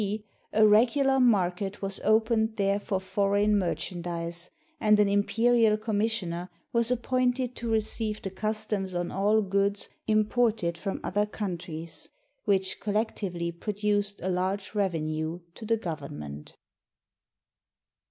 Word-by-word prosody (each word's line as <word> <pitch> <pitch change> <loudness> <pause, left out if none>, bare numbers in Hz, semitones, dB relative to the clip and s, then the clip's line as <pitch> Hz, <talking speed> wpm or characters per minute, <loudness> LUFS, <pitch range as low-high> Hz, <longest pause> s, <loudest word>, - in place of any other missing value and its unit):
d. 210 +1 -2 0.3
a 215 0 +5
regular 260 +6 +4
market 195 -4 +2
was 195 0 0
opened 220 0 +2
there 200 0 +2
for 200 -2 -2
foreign 200 +2 +2
merchandise, 170 -2 -2 0.3
and 210 -1 +4
an 205 - +5
im 200 0 +3
perial 225 0 +3
commissioner 210 -5 -1 0.2
was 235 0 +2
appointed 250 0 0
to 235 - -4
receive 220 -1 0
the 195 - -3
customs 215 -2 -2
on 175 0 -2
all 210 +3 +2
goods 200 +1 0 0.2
imported 215 -4 +2
from 195 +3 -4
other 205 +2 0
countries, 170 -6 -5 0.4
which 190 -2 +1
col 205 -1 -3
lectively 185 -6 -1
produced 205 -1 0
a - - -1
large 190 +2 -1
revenue 160 -4 -1
to 220 - -9
the 225 0 +3
Government. 75 - -7
205 Hz, 125 wpm, -28 LUFS, 185-220 Hz, 0.4 s, a